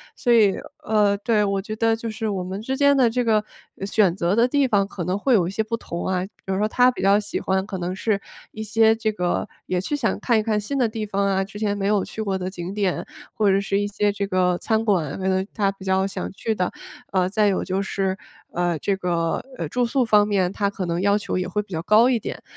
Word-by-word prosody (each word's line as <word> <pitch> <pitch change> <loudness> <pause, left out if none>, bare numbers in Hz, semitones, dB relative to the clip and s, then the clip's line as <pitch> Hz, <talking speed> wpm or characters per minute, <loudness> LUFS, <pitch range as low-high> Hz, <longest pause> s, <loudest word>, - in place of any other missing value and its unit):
所 245 - 0
以 215 -5 +5 0.3
呃， 205 -2 +3
对， 210 0 +1
我 200 -1 0
觉 215 +2 -6
得 225 0 +2
就 230 0 -5
是 220 0 -3
我 190 -3 -2
们 190 +2 -5
之 265 +4 -3
间 280 0 +5
的 255 -4 +4
这 245 +2 -1
个 215 -2 +3 0.4
选 200 -3 +2
择 175 0 0
的 235 +1 +5
地 285 +2 +2
方 200 -4 +2
可 190 -3 -5
能 180 +4 -1
会 260 +5 +2
有 190 -7 +4
一 - - -3
些 210 - -1
不 225 +1 -2
同 170 -6 -5
啊。 185 -1 0 0.2
比 195 - -3
如 - - 0
说 210 - +2
她 250 +3 +5
比 - - -7
较 200 +2 +4
喜 205 0 -4
欢， 190 0 0
可 195 -1 -5
能 180 +1 -2
是 200 +1 0 0.3
一 215 - -7
些 220 +1 +4
这 220 -1 -1
个 180 0 -1 0.2
也 180 -1 -1
是 295 - -2
想 240 -6 0
看 235 -3 +2
一 - - -1
看 215 -1 0
新 275 +7 -3
的 250 -3 +3
地 220 -1 -4
方 200 -1 -1
啊， 195 -1 +1
之 195 +1 -10
前 205 -1 0
没 195 0 -1
有 205 -2 +2
去 220 - -6
过 195 -3 -1
的 185 0 -3
景 185 0 -6
点， 200 -3 -1 0.3
或 210 -2 +2
者 195 - +3
是 200 0 0
一 - - 0
些 205 0 0
这 200 0 -2
个 180 -2 +2
餐 220 0 0
馆， 165 -9 0
可 190 - -2
能 190 0 +1
她 200 -3 +1
比 195 - -13
较 190 0 +1
想 195 - -5
去 220 +3 -2
的。 180 -2 -1 0.4
呃， 185 -1 +2
再 210 +2 +2
有 195 - +1
就 190 +1 -1
是， 195 -1 -1 0.4
呃， 175 -1 0
这 200 - -1
个， 170 -3 -1 0.2
呃， 165 - -3
住 245 +7 +1
宿 255 +2 +1
方 210 -1 +4
面 190 -3 +1
她 200 0 0
可 200 -2 -4
能 170 0 -1
要 200 +1 +3
求 210 - -3
也 185 0 -1
会 200 +3 -1
比 200 - -24
较 160 - -2
高 215 +6 +5
一 245 -3 +2
点。 - - -7
200 Hz, 285 characters per minute, -23 LUFS, 190-220 Hz, 0.4 s, 以